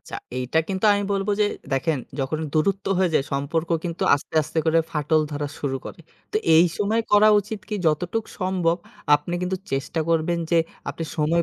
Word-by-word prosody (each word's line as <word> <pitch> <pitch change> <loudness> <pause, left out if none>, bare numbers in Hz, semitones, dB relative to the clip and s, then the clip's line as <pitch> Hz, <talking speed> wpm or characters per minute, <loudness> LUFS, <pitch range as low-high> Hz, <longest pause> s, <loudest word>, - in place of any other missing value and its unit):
আচ্ছা, - - -8 0.2
এইটা 130 +5 0
কিন্তু 190 +1 -2
আমি 205 - 0
বলবো 195 +1 0
যে 210 - +5 0.3
দেখেন, 145 +2 +1 0.2
যখন 135 +4 -1 0.2
দূরত্ব 195 +5 +1
হয়ে 185 -2 +2
যায় 135 - +3
সম্পর্ক 150 +4 -1 0.2
কিন্তু 170 0 -3
আস্তে, 145 - -7
আস্তে 155 - -4
করে 160 +1 +4
ফাটল 150 +1 +2
ধরা 145 0 -3
শুরু 135 -2 -2
করে। - - -9 0.3
তো - - +1 0.2
এই 165 - +7
সময় 215 +3 +1
করা 210 +1 +7
উচিত 210 +1 -7
কি, 215 - -3
যতটুক 175 +8 0
সম্ভব 185 -3 +1 0.4
আপনি 150 +4 -1
কিন্তু 180 +1 -1 0.2
চেষ্টা 135 +4 -1
করবেন 165 +1 +1
যে 170 - +4 0.3
আপনি 165 - -5
সময় 165 +2 +2
165 Hz, 185 wpm, -23 LUFS, 150-190 Hz, 0.4 s, এই